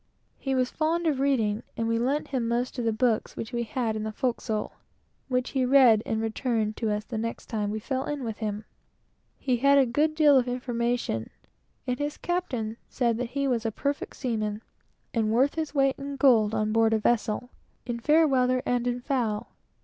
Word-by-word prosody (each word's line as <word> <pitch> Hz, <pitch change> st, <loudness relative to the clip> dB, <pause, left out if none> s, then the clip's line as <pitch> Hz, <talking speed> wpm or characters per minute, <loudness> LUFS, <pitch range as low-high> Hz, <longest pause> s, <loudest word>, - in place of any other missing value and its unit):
He 270 Hz, -1 st, -1 dB
was 255 Hz, -1 st, +1 dB
very -, -, -30 dB
fond 330 Hz, +2 st, +1 dB
of 295 Hz, -5 st, +1 dB
reading, 230 Hz, -6 st, +1 dB, 0.2 s
and 230 Hz, -, -1 dB
we 230 Hz, 0 st, +1 dB
lent 275 Hz, +5 st, 0 dB
him 255 Hz, -4 st, -1 dB
most 245 Hz, +2 st, -1 dB
of 240 Hz, -, -1 dB
the 225 Hz, -, +2 dB
books 220 Hz, 0 st, 0 dB
which 225 Hz, +2 st, -6 dB
we 240 Hz, -, 0 dB
had 230 Hz, -1 st, -2 dB
in 215 Hz, -, -3 dB
the 215 Hz, 0 st, -3 dB
forecastle, 230 Hz, -2 st, -2 dB, 0.6 s
which 250 Hz, -1 st, -1 dB
he 265 Hz, -2 st, +1 dB
read 250 Hz, -4 st, +6 dB
and 220 Hz, -, 0 dB
returned 225 Hz, -1 st, -1 dB
to 225 Hz, -, -1 dB
us 210 Hz, 0 st, -1 dB
the 225 Hz, -2 st, -4 dB
next 230 Hz, +1 st, -4 dB
time 210 Hz, -2 st, -2 dB
we 215 Hz, -, -2 dB
fell 260 Hz, +4 st, -2 dB
in 295 Hz, -2 st, -3 dB
with 225 Hz, -3 st, -5 dB
him. 210 Hz, -1 st, -3 dB, 0.7 s
He 255 Hz, -3 st, 0 dB
had 280 Hz, +3 st, +5 dB
a 275 Hz, -, +6 dB
good 300 Hz, +6 st, +1 dB
deal 295 Hz, -3 st, +6 dB
of 250 Hz, -, -2 dB
information, 240 Hz, -, -2 dB, 0.6 s
and 250 Hz, 0 st, -2 dB
his 290 Hz, 0 st, -2 dB
captain 250 Hz, -11 st, -2 dB
said 235 Hz, -3 st, 0 dB
he 270 Hz, +3 st, -1 dB
was 240 Hz, -4 st, 0 dB
a 225 Hz, -, -1 dB
perfect 280 Hz, +6 st, -3 dB
seaman, 215 Hz, -4 st, -2 dB, 0.5 s
and 220 Hz, -2 st, +1 dB
worth 260 Hz, +5 st, +3 dB
his 315 Hz, -2 st, -4 dB
weight 275 Hz, -1 st, +2 dB
in 280 Hz, 0 st, -5 dB
gold 230 Hz, -6 st, +4 dB
on 215 Hz, 0 st, 0 dB
board 225 Hz, 0 st, +3 dB
a -, -, +4 dB
vessel, 225 Hz, +2 st, 0 dB, 0.3 s
in 240 Hz, -1 st, -3 dB
fair 310 Hz, +6 st, +4 dB
weather 255 Hz, -2 st, +2 dB
and 245 Hz, 0 st, 0 dB
in 245 Hz, 0 st, -1 dB
foul. 240 Hz, -6 st, -1 dB
245 Hz, 205 wpm, -27 LUFS, 225-270 Hz, 0.7 s, read